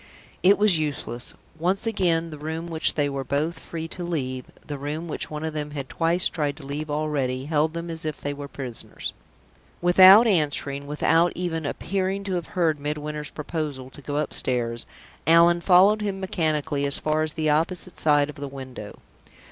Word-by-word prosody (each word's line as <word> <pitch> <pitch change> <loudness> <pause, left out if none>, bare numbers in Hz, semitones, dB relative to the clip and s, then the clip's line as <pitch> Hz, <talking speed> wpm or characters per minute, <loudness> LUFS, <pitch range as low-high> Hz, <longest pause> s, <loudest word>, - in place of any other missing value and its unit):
It 195 +3 +6
was 205 -5 +5
useless. 140 -5 -4 0.2
Once 185 +6 0
again, 170 -7 +1
the 150 - -8
room 160 +2 -4
which 160 -1 0
they 145 -2 +1
were 140 -1 -3
both 145 +6 -1
free 165 -1 -6
to 180 - -6
leave, 130 -7 -3 0.2
the 145 -2 -6
room 150 +4 -4
which 155 - -3
one 150 +1 -5
of 160 - -3
them 150 -1 -3
had 135 -2 -5
twice 170 +2 +2
tried 150 -4 -2
to 150 - -11
leave 150 +2 -4
already, 145 -4 -1
held 155 +1 +1
them 170 0 -4
as 160 -1 -1
if 155 -2 -4
they 145 - -3
were 145 0 -7
prisoners. 130 -4 -6 0.7
Without 185 +5 +8
answering, 145 -7 0
without 165 +3 +2
even 165 -4 -2
appearing 195 +4 -2
to 195 -1 -3
have 175 -2 -2
heard 160 -4 +2
Midwinter's 150 0 -4
proposal 150 -4 -5
to 145 - -11
go 145 +1 -4
upstairs, 120 -5 0 0.4
Allan 170 +1 +6
followed 195 +4 +5
him 200 -2 -2
mechanically 155 -6 -1
as 140 - +3
far 155 0 0
as 155 -1 0
the 155 -2 +1
opposite 170 +4 0
side 145 -2 +4
of 150 - -18
the 140 0 -5
window. 130 -6 -9
155 Hz, 180 wpm, -24 LUFS, 145-170 Hz, 0.7 s, Without